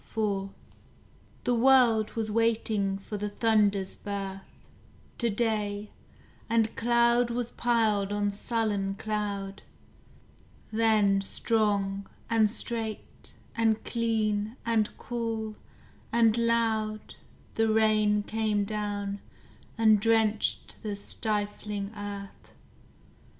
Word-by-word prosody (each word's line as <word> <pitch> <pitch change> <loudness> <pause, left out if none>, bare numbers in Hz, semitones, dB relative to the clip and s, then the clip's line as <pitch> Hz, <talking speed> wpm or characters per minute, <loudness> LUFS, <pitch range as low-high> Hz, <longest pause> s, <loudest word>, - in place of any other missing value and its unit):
IV 200 -3 0 0.9
The 245 - +1
world 235 -3 +4
was 220 -2 -2
waiting 220 -3 +1
for 205 +2 -6
the 210 +1 -3
thunder's 205 -3 +2
birth, 195 -1 -7 0.5
To 235 - +1
day, 210 -2 -1 0.6
and 225 -1 +2
cloud 235 +1 +3
was 240 0 -2
piled 220 -4 +1
on 205 0 0
sullen 205 -2 -1
cloud: 200 -2 -3 1.1
Then 215 -3 +3
strong, 200 -2 0 0.2
and 220 -2 +4
straight, 225 -1 -4 0.2
and 225 -1 +2
clean, 220 -2 0
and 225 -2 +2
cool, 225 -2 -3 0.6
and 230 -2 +4
loud 225 -2 0 0.4
The 225 0 +2
rain 215 -1 +3
came 215 -1 0
down, 205 -1 -3 0.6
and 220 -2 +5
drenched 220 -1 +1
the 210 -2 -3
stifling 205 0 -3
earth. 200 -1 -8
215 Hz, 95 wpm, -28 LUFS, 205-225 Hz, 1.1 s, and